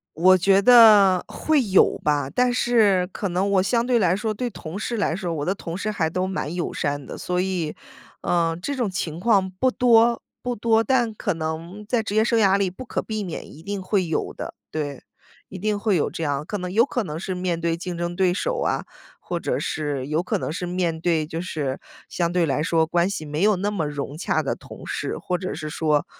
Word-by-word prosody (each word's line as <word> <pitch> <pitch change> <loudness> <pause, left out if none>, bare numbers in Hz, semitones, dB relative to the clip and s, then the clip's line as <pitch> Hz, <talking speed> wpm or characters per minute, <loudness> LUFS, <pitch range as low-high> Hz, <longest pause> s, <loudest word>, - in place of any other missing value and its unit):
我 185 +3 +6
觉 195 +2 +4
得 210 -6 +7
会 310 -4 +1
有 190 -1 +4
吧， 145 -2 +1
但 250 - +2
是 215 -7 +3
可 200 - -3
能 185 +3 0
我 190 -2 +3
相 235 +4 +1
对 245 -2 +3
来 180 -3 +3
说， 215 +2 -2
对 245 +3 -3
同 170 -4 -8
事 230 +3 -3
来 200 -6 0
说， 175 -3 -3
我 145 - -3
的 190 - +1
同 170 -2 -6
事 215 +2 -2
还 165 -6 0
都 185 +3 -1
蛮 185 -4 -3
友 175 - -3
善 145 -2 -2
的， - - -8
所 180 0 -2
以， 180 -4 -1 0.5
呃， 165 -1 +1
这 285 +9 -3
种 245 -5 -1
情 170 -3 -4
况 200 -3 +3
不 190 +8 +1
多 235 -1 +4 0.2
不 245 0 -2
多， 225 +1 +2
但 240 -3 +1
可 205 -1 -2
能 165 +6 -5
在 230 0 +1
职 210 -1 -4
业 220 - +5
生 230 0 +2
涯 195 -2 +4
里 195 -2 +1
不 190 +8 -9
可 - - -2
避 215 -1 -4
免， 175 -4 -6
一 150 - -13
定 200 +1 -4
会 185 0 0
有 160 - -2
的， - - -7 0.2
对， 145 -3 -4 0.4
一 190 - -9
定 210 +2 -1
会 210 -2 +1
有 155 - +1
这 165 - -5
样。 145 -1 -1
可 205 - -3
能 180 -1 -5
有 225 +5 +4
可 245 -4 -2
能 155 -5 -5
是 185 +1 -4
面 180 -2 -2
对 165 0 0
竞 175 0 -5
争 175 0 -2
对 185 -1 +2
手 - - -1
啊， - - 0 0.4
或 - - -3
者 - - -1
是 145 -4 -3
有 155 +3 0
可 210 +3 -1
能 - - -3
是 180 +2 -4
面 175 -2 -1
对 160 -2 +1
就 165 +2 -5
是 150 -7 -3 0.3
相 170 -1 -1
对 180 -2 +3
来 145 0 0
说 160 0 +2
关 170 +3 +1
系 160 -6 -4
没 150 +2 -3
有 210 +1 +4
那 200 +3 -1
么 180 -7 -1
融 145 0 -5
洽 170 - 0
的 - - -1
同 - - -12
事， - - -3
或 180 - -2
者 185 +1 -4
是 155 -1 -5
说， 150 -1 +1
185 Hz, 250 characters per minute, -23 LUFS, 165-210 Hz, 0.5 s, 得